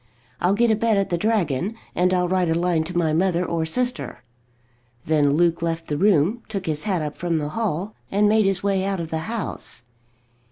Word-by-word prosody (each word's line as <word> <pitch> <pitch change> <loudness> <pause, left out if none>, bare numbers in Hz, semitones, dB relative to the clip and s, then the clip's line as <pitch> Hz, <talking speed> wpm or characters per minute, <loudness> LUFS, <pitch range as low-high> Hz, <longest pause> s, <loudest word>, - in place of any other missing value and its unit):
I'll 185 +3 +2
get 235 +1 +3
a - - +4
bed 225 -1 +1
at 195 -2 0
the - - +2
Dragon, 195 - 0 0.2
and 180 +1 +2
I'll 180 -1 +2
write 185 -1 +1
a 160 - +2
line 170 -1 +1
to 175 +1 -4
my 160 -3 +2
mother 180 +1 +1
or 165 -1 -1
sister." 245 +7 -2 0.8
Then 150 -2 +3
Luke 170 +1 +2
left 165 0 -2
the 150 - 0
room, 195 +5 +3
took 195 -4 -4
his 155 +3 -2
hat 185 -6 0
up 150 -1 -4
from 170 -2 -1
the 150 -1 -2
hall, 205 0 -2 0.2
and 205 +1 +3
made 215 -1 +4
his 195 -1 0
way 195 -1 +1
out 195 -1 -1
of 165 -1 -5
the 160 - -1
house. 215 - -3
180 Hz, 210 wpm, -23 LUFS, 160-205 Hz, 0.8 s, a